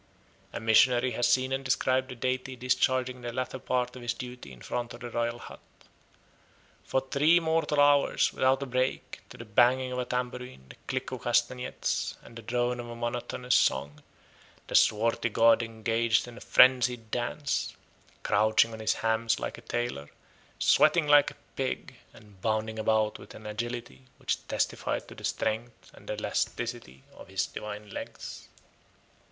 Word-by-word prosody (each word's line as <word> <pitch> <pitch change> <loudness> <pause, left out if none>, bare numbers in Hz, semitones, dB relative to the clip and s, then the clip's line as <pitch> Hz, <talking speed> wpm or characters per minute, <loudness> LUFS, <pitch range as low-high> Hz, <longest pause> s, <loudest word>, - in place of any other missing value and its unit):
A - - -5
missionary 120 +3 +4
has 120 +1 +1
seen 130 0 +2
and 135 0 -2
described 130 0 +1
the 125 - -7
deity 130 +2 -2
discharging 125 0 0
the 120 -1 -4
latter 130 +2 -4
part 125 -1 -1
of 125 - -9
his 120 -1 -2
duty 125 - -8
in 60 - -13
front 120 -1 -4
of - - -14
the 120 -1 -6
royal 120 0 -1
hut. - - -11 1.2
For 130 - 0
three 150 +6 +3
mortal 160 -2 0
hours, 145 0 +4
without 135 +1 +2
a - - -3
break, 130 0 -2
to - - -12
the 115 - -9
banging 125 +4 +3
of 125 - -3
a 125 - -1
tambourine, 125 - -4
the - - -11
click 130 -1 -3
of 130 -3 -5
castanettes, 120 +1 -1
and 115 - -14
the 115 - -8
drone 120 +2 -1
of 120 0 -6
a 120 - -7
monotonous 120 +1 -2
song, 70 +2 +2 0.6
the - - -9
swarthy 115 +2 +3
god 115 +1 +5
engaged 115 +1 0
in 120 - -10
a - - -12
frenzied 125 -3 +4
dance, 135 +4 -2 0.5
crouching 110 +2 +3
on 110 - -8
his 110 0 +1
hams 115 0 +1
like - - -5
a - - -14
tailor, 120 -13 -3 0.5
sweating 165 -4 +4
like 145 -1 +6
a - - -14 0.2
pig, 130 -1 -3
and 105 -4 -18
bounding 110 0 -1
about 110 -1 +1
with 100 - -12
an 110 - -12
agility 105 - -5
which - - -3
testified - - -2
to - - -11
the - - -13
strength 110 +2 -3
and - - -15
elasticity 65 +1 -3
of - - -13
his - - -1
divine 105 0 -8
legs. - - -8
120 Hz, 165 wpm, -29 LUFS, 110-130 Hz, 1.2 s, like